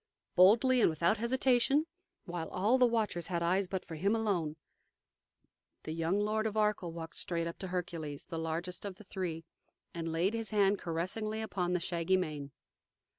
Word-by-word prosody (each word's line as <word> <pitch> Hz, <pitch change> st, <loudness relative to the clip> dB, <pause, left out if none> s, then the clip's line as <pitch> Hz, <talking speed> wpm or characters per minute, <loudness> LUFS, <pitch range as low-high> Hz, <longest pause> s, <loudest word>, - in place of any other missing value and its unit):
Boldly 235 Hz, +7 st, +6 dB
and -, -, +6 dB
without 170 Hz, +6 st, +2 dB
hesitation, 260 Hz, +4 st, +3 dB, 0.4 s
while 175 Hz, -3 st, -4 dB
all 215 Hz, +8 st, +2 dB
the 250 Hz, -, +6 dB
watchers 215 Hz, -8 st, 0 dB
had 170 Hz, -2 st, -1 dB
eyes 185 Hz, +3 st, +2 dB
but 190 Hz, 0 st, -3 dB
for 165 Hz, -, -8 dB
him 195 Hz, +7 st, +1 dB
alone, 185 Hz, -9 st, 0 dB, 1.3 s
the 155 Hz, -, -5 dB
young 165 Hz, +4 st, 0 dB
Lord 215 Hz, +1 st, +1 dB
of 215 Hz, 0 st, -4 dB
Arkell 210 Hz, -5 st, +1 dB
walked 165 Hz, 0 st, -7 dB
straight 170 Hz, -1 st, -1 dB
up 170 Hz, -, -5 dB
to 190 Hz, -, -4 dB
Hercules, 165 Hz, -5 st, -4 dB
the 165 Hz, -, -5 dB
largest 170 Hz, +3 st, -3 dB
of 200 Hz, -2 st, -5 dB
the 215 Hz, -, -14 dB
three, 175 Hz, -4 st, -4 dB, 0.5 s
and 165 Hz, -1 st, -3 dB
laid 175 Hz, +6 st, +1 dB
his 225 Hz, -2 st, -2 dB
hand 205 Hz, -1 st, +3 dB
caressingly 190 Hz, +6 st, -2 dB
upon 180 Hz, -5 st, -1 dB
the 180 Hz, -, +2 dB
shaggy 170 Hz, +1 st, +1 dB
mane. 150 Hz, -6 st, -3 dB
185 Hz, 175 wpm, -32 LUFS, 165-215 Hz, 1.3 s, Boldly